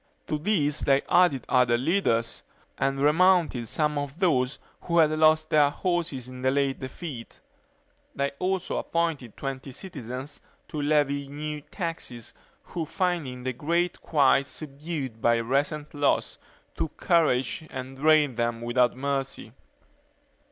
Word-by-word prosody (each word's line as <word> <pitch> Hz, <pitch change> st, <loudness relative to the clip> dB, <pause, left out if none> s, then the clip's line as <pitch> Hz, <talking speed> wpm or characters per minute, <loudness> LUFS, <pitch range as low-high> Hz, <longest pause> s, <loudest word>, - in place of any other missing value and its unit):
To 150 Hz, -, -2 dB
these 150 Hz, -5 st, +1 dB
they 135 Hz, 0 st, +3 dB
added 175 Hz, -7 st, +3 dB
other 125 Hz, -2 st, +3 dB
leaders, 120 Hz, -6 st, 0 dB, 0.3 s
and 135 Hz, 0 st, 0 dB
remounted 155 Hz, -4 st, +3 dB
some 150 Hz, +3 st, 0 dB
of 145 Hz, +1 st, -5 dB
those 140 Hz, -8 st, +1 dB, 0.3 s
who 170 Hz, -1 st, 0 dB
had 155 Hz, -2 st, +5 dB
lost 155 Hz, 0 st, +3 dB
their 150 Hz, -2 st, +5 dB
horses 165 Hz, -6 st, -2 dB
in 130 Hz, 0 st, -9 dB
the 130 Hz, -, +2 dB
late 135 Hz, 0 st, 0 dB
defeat. 130 Hz, -2 st, -7 dB, 0.8 s
They 140 Hz, 0 st, 0 dB
also 190 Hz, 0 st, -1 dB
appointed 160 Hz, -9 st, -2 dB
twenty 135 Hz, 0 st, -5 dB
citizens 130 Hz, -, -7 dB, 0.3 s
to 155 Hz, -3 st, -3 dB
levy 145 Hz, -1 st, +1 dB
new 150 Hz, +1 st, -5 dB
taxes, 150 Hz, -, -6 dB, 0.3 s
who 170 Hz, -, -4 dB
finding 155 Hz, -7 st, -2 dB
the 130 Hz, 0 st, -2 dB
great 170 Hz, +7 st, -1 dB
quite 140 Hz, -2 st, +3 dB
subdued 140 Hz, -6 st, -6 dB
by 120 Hz, 0 st, +4 dB
the 115 Hz, -, -1 dB
recent 145 Hz, +4 st, -1 dB
loss, 145 Hz, -1 st, 0 dB, 0.4 s
took 155 Hz, -, -4 dB
courage 155 Hz, -3 st, +1 dB
and 130 Hz, 0 st, -7 dB
drained 150 Hz, -3 st, +3 dB
them 120 Hz, -1 st, -1 dB
without 120 Hz, +1 st, +2 dB
mercy. 135 Hz, -3 st, -3 dB
145 Hz, 135 wpm, -26 LUFS, 130-160 Hz, 0.8 s, had